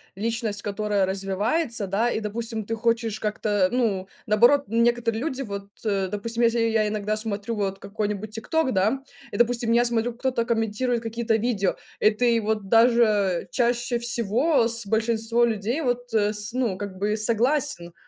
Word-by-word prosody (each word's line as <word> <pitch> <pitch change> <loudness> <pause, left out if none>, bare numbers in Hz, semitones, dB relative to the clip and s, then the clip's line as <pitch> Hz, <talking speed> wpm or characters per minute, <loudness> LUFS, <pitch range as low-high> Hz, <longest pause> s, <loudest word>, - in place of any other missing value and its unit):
личность, 220 0 -2
которая 205 -1 0
развивается, 200 - -1
да. 210 +5 +1
И, - - -1
допустим, 220 +1 -4
ты 225 +3 -3
хочешь 230 -1 0
как-то, 210 -3 0
ну, 210 -7 0 0.2
наоборот, 240 +7 +5
некоторые 230 0 +1
люди, 275 -3 -2
вот, 200 -5 -6
э, 195 -3 0
допустим, 230 +4 -2
если 235 0 +3
я 225 -2 +2
иногда 210 0 -2
смотрю 215 0 -3
вот 195 -2 -2
какой-нибудь 210 +1 -3
тик-ток, 290 +5 0
да, 215 +8 +1 0.3
и, - - -4
допустим, 240 -1 +2
я 235 +1 +4
смотрю, 235 0 0
кто-то 250 -1 -1
комментирует 230 +1 0
какие-то 230 0 -1
видео, 215 -4 0 0.2
и 215 - +5
ты 235 +1 +2
вот 215 -2 -2
даже 225 -6 +3
чаще 240 0 +1
всего 240 +3 +1
с 230 -2 -2
большинством 225 +2 +1
людей 225 +7 -2
вот, 245 -3 -2
э, 210 -1 +2
с 210 +1 -1
ну, 240 -7 0
как 200 -2 -6
бы 210 +2 0
согласен, 230 - 0
225 Hz, 160 wpm, -24 LUFS, 205-240 Hz, 0.3 s, наоборот